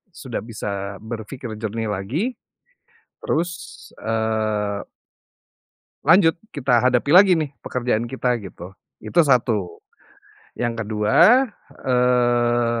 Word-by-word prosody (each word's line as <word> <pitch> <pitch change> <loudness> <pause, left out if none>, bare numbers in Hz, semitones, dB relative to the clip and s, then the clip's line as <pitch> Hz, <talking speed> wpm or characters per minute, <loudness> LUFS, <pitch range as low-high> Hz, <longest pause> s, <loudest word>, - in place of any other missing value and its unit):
sudah 130 -4 -5
bisa 100 -3 -5
berfikir 115 +1 -7
jernih 110 0 -3
lagi. 135 - -2 0.9
Terus, 170 +3 -1 0.5
eee 110 -2 -1 1.2
lanjut 165 -4 +5 0.2
kita 125 -5 +2
hadapi 125 +2 +2
lagi 190 0 +8
nih, 150 -3 -3
pekerjaan 120 -2 -1
kita 125 -1 0
gitu. 90 -1 -10 0.3
Itu 170 - +2
1. 115 - +1 0.8
Yang 120 -1 -1
ke-2, 160 - +4 0.4
eee 120 -2 +2
120 Hz, 95 wpm, -22 LUFS, 110-130 Hz, 1.2 s, lagi